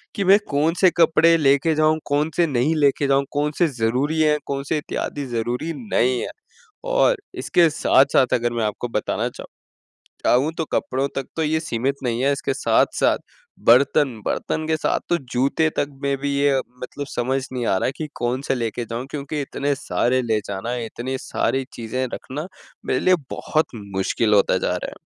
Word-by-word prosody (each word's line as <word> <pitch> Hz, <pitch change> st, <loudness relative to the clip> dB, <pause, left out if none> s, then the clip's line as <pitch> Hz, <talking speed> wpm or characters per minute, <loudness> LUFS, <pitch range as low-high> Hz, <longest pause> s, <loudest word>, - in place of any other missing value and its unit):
कि 200 Hz, -, 0 dB
मैं 195 Hz, +2 st, +6 dB
कौन-से 165 Hz, +6 st, +3 dB
कपड़े 165 Hz, 0 st, +5 dB
लेके 145 Hz, +2 st, +3 dB
जाऊँ 155 Hz, +1 st, +3 dB
कौन-से 150 Hz, +4 st, +1 dB
नहीं 140 Hz, +3 st, +1 dB
लेके 140 Hz, -1 st, +2 dB
जाऊँ 140 Hz, 0 st, +2 dB
कौन-से 150 Hz, +4 st, +1 dB
ज़रूरी 135 Hz, +8 st, +1 dB
हैं 150 Hz, -1 st, +4 dB
कौन-से 140 Hz, +2 st, -2 dB
इत्यादि 145 Hz, -1 st, -4 dB
ज़रूरी 125 Hz, +8 st, -2 dB
नहीं 130 Hz, -, +1 dB
है? -, -, -4 dB, 0.5 s
और -, -, +3 dB, 0.2 s
इसके 170 Hz, -2 st, +3 dB
साथ-साथ 135 Hz, -3 st, +3 dB
अगर 120 Hz, 0 st, +1 dB
मैं 115 Hz, -, -1 dB
आपको 105 Hz, +3 st, -3 dB
बताना 105 Hz, -2 st, -1 dB
चाहूँ -, -, -11 dB, 0.8 s
चाहूँ 135 Hz, +6 st, +3 dB
तो 160 Hz, -, 0 dB
कपड़ों 135 Hz, +2 st, 0 dB
तक 135 Hz, -, -2 dB
तो 160 Hz, -, 0 dB
ये 160 Hz, +1 st, +1 dB
सीमित 135 Hz, -1 st, -1 dB
नहीं 120 Hz, -1 st, -1 dB
है। 140 Hz, -, +3 dB
इसके 140 Hz, -1 st, -2 dB
साथ-साथ 135 Hz, -, +2 dB, 0.5 s
बर्तन 135 Hz, +3 st, +5 dB, 0.2 s
बर्तन 155 Hz, -, -2 dB
के 160 Hz, -, +2 dB
साथ -, -, 0 dB
तो 175 Hz, -, +3 dB, 0.2 s
जूते 140 Hz, +5 st, +2 dB
तक 140 Hz, -, +1 dB, 0.2 s
में 140 Hz, 0 st, +1 dB
भी 140 Hz, +1 st, -2 dB
ये 140 Hz, -2 st, +3 dB, 0.2 s
मतलब 140 Hz, +2 st, -6 dB
समझ 130 Hz, +3 st, 0 dB
नहीं 125 Hz, -2 st, -2 dB
आ 95 Hz, -, +2 dB
रहा -, -, 0 dB
कि 155 Hz, -, -4 dB
कौन-से 130 Hz, +3 st, -1 dB
लेके 115 Hz, 0 st, -3 dB
जाऊँ। 120 Hz, +4 st, -5 dB
क्योंकि 145 Hz, +1 st, -4 dB
इतने 140 Hz, +1 st, -2 dB
सारे 130 Hz, -2 st, 0 dB
ले 110 Hz, -2 st, +1 dB
जाना 100 Hz, +3 st, -4 dB
है 120 Hz, -2 st, -3 dB
इतनी 130 Hz, +4 st, -4 dB
सारी 135 Hz, 0 st, -1 dB
चीज़ें 120 Hz, +3 st, -3 dB
रखना 150 Hz, +6 st, -6 dB, 0.4 s
मेरे 130 Hz, -, +1 dB
लिए 185 Hz, 0 st, +5 dB, 0.2 s
बहुत 155 Hz, -5 st, -1 dB, 0.2 s
मुश्किल 105 Hz, +3 st, +1 dB
होता 100 Hz, -, +3 dB
जा -, -, -1 dB
रहा -, -, -5 dB
है। -, -, -13 dB
140 Hz, 175 wpm, -22 LUFS, 125-155 Hz, 0.8 s, मैं